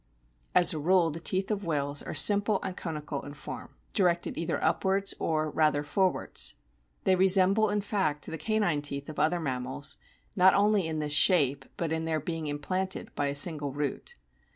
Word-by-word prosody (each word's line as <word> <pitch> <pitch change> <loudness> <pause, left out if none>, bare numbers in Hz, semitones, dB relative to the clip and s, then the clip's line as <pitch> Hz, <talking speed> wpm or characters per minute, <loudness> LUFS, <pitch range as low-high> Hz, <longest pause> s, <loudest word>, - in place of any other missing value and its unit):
As 180 - +6
a 155 - -3
rule 170 +1 +3
the 160 - -6
teeth 190 +4 +1
of 205 -1 -2
whales 145 -4 -2
are - - -7
simple 205 0 +3
and 190 -1 -4
conical 150 -5 -5
in 145 0 -9
form, 145 - -9 0.2
directed 175 -3 0
either 165 0 -2
upwards 190 +4 +1
or, 155 -1 -1
rather, 150 -2 +1
forwards. 185 - -1 0.5
They 185 - +3
resemble 190 +3 +4
in 205 0 0
fact 190 -8 -1
the 160 - -6
canine 200 -5 0
teeth 140 0 -4
of 155 - -7
other 160 +4 +2
mammals, 130 0 -3 0.4
not 190 0 +5
only 205 -3 +2
in 160 -1 -3
this 150 -1 0
shape, 145 -6 +3
but 165 -2 -2
in 160 0 -2
their 160 -1 -1
being 160 +1 -4
implanted 185 +6 -3
by 145 - -1
a 140 - -2
single 145 -2 +2
root. 145 -1 -4
160 Hz, 175 wpm, -28 LUFS, 145-190 Hz, 0.5 s, As